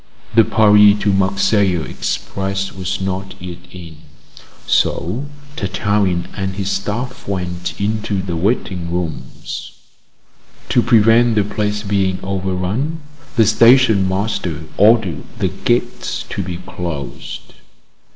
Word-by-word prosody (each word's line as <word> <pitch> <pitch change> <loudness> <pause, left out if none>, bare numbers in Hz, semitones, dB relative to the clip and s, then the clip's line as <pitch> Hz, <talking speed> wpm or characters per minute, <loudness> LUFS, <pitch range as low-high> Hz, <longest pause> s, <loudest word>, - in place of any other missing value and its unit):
The 115 - +7
Paris 105 -2 +6
to 100 - +2
Marseilles 95 -2 +2
express 95 0 -3
was 95 0 -3
not 95 0 -3
yet 90 -1 -8
in, 85 -4 -11 0.7
so 115 - 0 0.3
Tartarin 100 -3 0
and 95 -1 -3
his 100 0 -2
staff 115 +7 -4
went 90 -2 -4
into 105 -1 -1
the 90 -2 -3
waiting 90 -2 -1
rooms. 85 -4 -5 1.0
To 120 - +4
prevent 115 0 +4
the 105 - +3
place 105 +1 -2
being 100 -2 0
overrun, 95 - -2 0.3
the 115 -2 +5
station 115 -2 +5
master 95 -5 -2
ordered 105 -6 +3
the - - 0
gates - - -1
to 100 - -3
be 90 -2 -4
closed. 85 -5 -7
100 Hz, 110 wpm, -18 LUFS, 90-105 Hz, 1.0 s, The